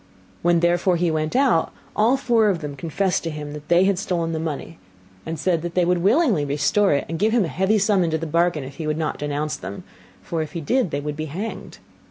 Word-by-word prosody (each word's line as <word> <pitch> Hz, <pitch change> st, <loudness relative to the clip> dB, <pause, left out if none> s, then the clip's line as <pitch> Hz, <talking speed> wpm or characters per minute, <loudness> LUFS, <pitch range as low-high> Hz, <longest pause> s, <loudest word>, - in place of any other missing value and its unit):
When 170 Hz, -1 st, +3 dB
therefore 175 Hz, +1 st, +2 dB
he 170 Hz, -1 st, +1 dB
went 155 Hz, +3 st, -2 dB
out, 255 Hz, -11 st, +3 dB, 0.2 s
all 230 Hz, +5 st, +3 dB
four 230 Hz, -5 st, +3 dB
of 180 Hz, -4 st, -1 dB
them 145 Hz, -2 st, -5 dB
confessed 170 Hz, +6 st, -1 dB
to 165 Hz, -, -2 dB
him 150 Hz, -1 st, -6 dB
that 150 Hz, 0 st, -9 dB
they 175 Hz, +2 st, +4 dB
had 195 Hz, -2 st, +2 dB
stolen 170 Hz, -4 st, -1 dB
the 160 Hz, -, -2 dB
money, 160 Hz, +1 st, -5 dB, 0.5 s
and 165 Hz, 0 st, -3 dB
said 170 Hz, +1 st, 0 dB
that 170 Hz, 0 st, -5 dB
they 180 Hz, -1 st, +3 dB
would 180 Hz, 0 st, +2 dB
willingly 210 Hz, -, +3 dB
restore 145 Hz, +8 st, +2 dB
it 140 Hz, -, -1 dB
and 165 Hz, +1 st, -4 dB
give 215 Hz, +3 st, +2 dB
him 235 Hz, -5 st, +3 dB
a -, -, -4 dB
heavy 190 Hz, +6 st, +1 dB
sum 200 Hz, -2 st, +3 dB
into 160 Hz, -2 st, 0 dB
the 165 Hz, -, -4 dB
bargain, 170 Hz, -1 st, +1 dB
if 135 Hz, +1 st, -10 dB
he 160 Hz, -2 st, -4 dB
would 155 Hz, 0 st, -1 dB
not 155 Hz, -2 st, -2 dB
denounce 150 Hz, +1 st, -2 dB
them, 95 Hz, +2 st, -8 dB, 0.4 s
for 165 Hz, -2 st, -2 dB
if 155 Hz, -, -5 dB
he 170 Hz, -, -3 dB
did 215 Hz, -, +1 dB
they 145 Hz, -, -3 dB
would 150 Hz, 0 st, -4 dB
be 155 Hz, +1 st, -4 dB
hanged. 190 Hz, +9 st, -6 dB
170 Hz, 245 wpm, -22 LUFS, 155-190 Hz, 0.5 s, they